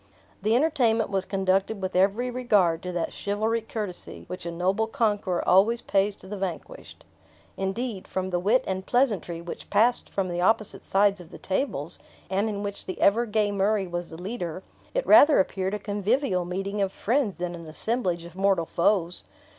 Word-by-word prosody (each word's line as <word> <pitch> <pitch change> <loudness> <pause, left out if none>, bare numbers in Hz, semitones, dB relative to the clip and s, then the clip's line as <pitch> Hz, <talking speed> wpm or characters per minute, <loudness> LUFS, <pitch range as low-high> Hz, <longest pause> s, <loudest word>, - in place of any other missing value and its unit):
The 215 +3 +2
entertainment 240 -7 +2
was 190 -1 0
conducted 195 +2 0
with 190 -1 -4
every 200 +7 +2
regard 205 -10 +2
to 180 - -5
that 175 -2 -2
chivalric 220 +2 -1
courtesy 205 -5 -5
which 180 -1 -7
a - - -3
noble 190 +6 0
conqueror 205 -5 0
always 215 +6 +4
pays 200 +1 +1
to 190 - -14
the 205 0 -6
vanquished. 195 - -6 0.5
Indeed, 195 +2 -3
from 185 0 -3
the 175 - +1
wit 215 +8 +3
and 190 0 -3
pleasantry 205 - 0
which 170 - -8
passed 240 +3 +2
from 195 -2 -1
the 175 0 -2
opposite 215 +2 +1
sides 200 0 +2
of 165 - -14
the - - -10
tables, 185 - -1 0.3
and 200 +3 +1
in 205 -1 -4
which 200 0 -5
the 185 - -5
ever 230 +4 +3
gay 210 -1 +1
Murray 200 0 +1
was 175 -1 -4
the 160 - -9
leader, 185 -3 -5 0.3
it - - 0
rather 315 -2 +7
appeared 190 +1 0
a - - -1
convivial 205 -1 0
meeting 195 +3 -3
of 195 -1 +1
friends 230 0 0
than 175 0 -3
an 170 -2 -9
assemblage 180 0 -1
of 170 0 -12
mortal 190 -3 +2
foes. 175 0 +1
195 Hz, 180 wpm, -26 LUFS, 180-220 Hz, 0.5 s, rather